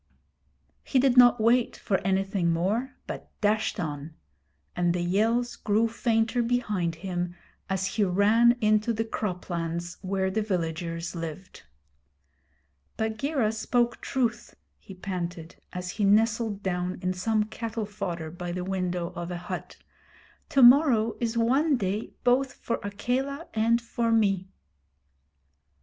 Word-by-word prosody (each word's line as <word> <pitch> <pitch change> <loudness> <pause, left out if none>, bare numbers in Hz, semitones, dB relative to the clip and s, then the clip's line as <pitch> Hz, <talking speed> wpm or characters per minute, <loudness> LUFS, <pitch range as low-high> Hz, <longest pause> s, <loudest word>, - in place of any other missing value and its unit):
He 270 - 0
did 260 -1 +4
not 245 -1 +7
wait 235 +2 +2
for 195 - 0
anything 195 -2 0
more, 210 +11 -1
but - - -7
dashed 215 +1 +1
on; 155 -1 -5 0.6
and 175 0 +1
the 180 - -1
yells 225 +7 +1
grew 215 +2 +1
fainter 225 +1 +1
behind 210 -8 0
him 175 0 -4 0.3
as 190 0 0
he 205 +2 0
ran 210 +6 +4
into 215 +2 +3
the 225 +1 -1
croplands 175 -5 -3
where 190 0 -1
the 220 +3 0
villagers 165 -3 -3
lived. 165 +2 -7 1.4
'Bagheera 220 +2 0
spoke 240 +2 0
truth,' 240 -4 -2 0.2
he 195 - -12
panted, 175 -3 -5
as 180 0 -5
he 210 - -3
nestled 215 0 +2
down 180 -1 -2
in 185 0 0
some 215 +4 +1
cattle 220 0 -4
fodder 175 -6 -5
by 175 +1 -5
the 180 +1 -3
window 180 -2 -2
of 175 -1 -5
a 175 - -4
hut. 175 - -6 0.7
'To 270 - +4
morrow 240 -4 +6
is 235 -1 -1
one 270 +6 +3
day 200 +1 -2
both 255 +1 +2
for 235 - -3
Akela 260 +9 -2
and 230 +1 +3
for 235 0 -1
me.' 195 -4 +2
210 Hz, 130 wpm, -27 LUFS, 180-230 Hz, 1.4 s, not